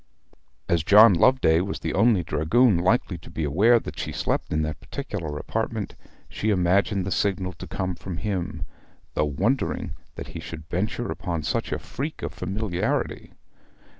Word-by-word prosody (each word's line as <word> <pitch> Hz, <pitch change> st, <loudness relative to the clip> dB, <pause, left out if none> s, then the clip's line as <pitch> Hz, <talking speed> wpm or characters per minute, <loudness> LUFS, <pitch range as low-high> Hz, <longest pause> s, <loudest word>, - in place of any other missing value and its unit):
As 85 Hz, -2 st, +2 dB
John 105 Hz, +4 st, +8 dB
Loveday 85 Hz, -4 st, +4 dB
was 100 Hz, +2 st, -4 dB
the -, -, -2 dB
only 105 Hz, -3 st, +4 dB
dragoon 85 Hz, +8 st, +3 dB
likely 90 Hz, -1 st, +1 dB
to 80 Hz, -, -14 dB
be 80 Hz, -1 st, -4 dB
aware 105 Hz, +12 st, +4 dB
that -, -, -8 dB
she -, -, -3 dB
slept -, -, -2 dB
in 80 Hz, 0 st, +1 dB
that 75 Hz, -1 st, -3 dB
particular 95 Hz, -, -5 dB
apartment, 110 Hz, +4 st, -3 dB, 0.3 s
she 110 Hz, -, -2 dB
imagined 95 Hz, 0 st, +2 dB
the 95 Hz, -, -3 dB
signal 95 Hz, -2 st, 0 dB
to 80 Hz, -, -9 dB
come 95 Hz, -1 st, -2 dB
from 90 Hz, -1 st, -6 dB
him, 90 Hz, -4 st, -3 dB, 0.5 s
though 75 Hz, -, +1 dB
wondering 100 Hz, -, -1 dB, 0.2 s
that -, -, -7 dB
he -, -, -7 dB
should 80 Hz, -1 st, -8 dB
venture 110 Hz, +7 st, -1 dB
upon 85 Hz, -4 st, -3 dB
such -, -, -1 dB
a -, -, 0 dB
freak 145 Hz, +5 st, -6 dB
of -, -, -3 dB
familiarity. 95 Hz, -1 st, -2 dB
95 Hz, 165 wpm, -25 LUFS, 85-110 Hz, 0.5 s, John